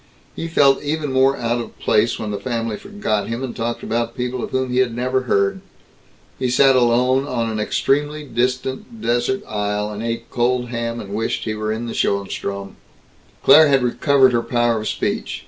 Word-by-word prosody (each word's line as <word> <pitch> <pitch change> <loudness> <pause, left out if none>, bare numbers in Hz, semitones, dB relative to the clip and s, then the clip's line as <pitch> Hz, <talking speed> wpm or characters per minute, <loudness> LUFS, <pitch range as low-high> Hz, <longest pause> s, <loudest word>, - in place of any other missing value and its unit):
He 165 - -4
felt 140 -4 +4
even 150 -1 -2
more 135 +1 +3
out 120 0 -1
of - - -10
place 110 +2 +2
when 105 -1 -4
the 100 - -3
family 115 -1 -2
forgot 200 - -3
him 115 +3 -4
and 130 - -5
talked 115 +1 -3
about 115 0 -2
people 125 0 -3
of - - -4
whom 130 -1 -1
he 125 - +1
had 120 -3 +1
never 130 +2 0
heard. 100 0 +1 0.8
He 130 -1 0
sat 135 +2 +5
alone 125 +2 +3
on 115 -4 -1
an 110 - -3
extremely 145 +7 0
distant 130 - -2
desert 120 - 0
isle 105 0 -2
and 105 0 -6
ate 115 0 -3
cold 125 0 0
ham 115 -1 -3
and 100 -2 -7
wished 110 +2 -2
he 110 - -2
were 110 0 -3
in 110 +2 -3
Schoenstrom. 100 0 -2 0.7
Claire 155 0 +8
had 135 -3 +3
recovered 130 +1 +3
her 120 - +2
power 120 -2 +1
of 110 - -4
speech. - - -2
120 Hz, 185 wpm, -20 LUFS, 115-130 Hz, 0.8 s, Claire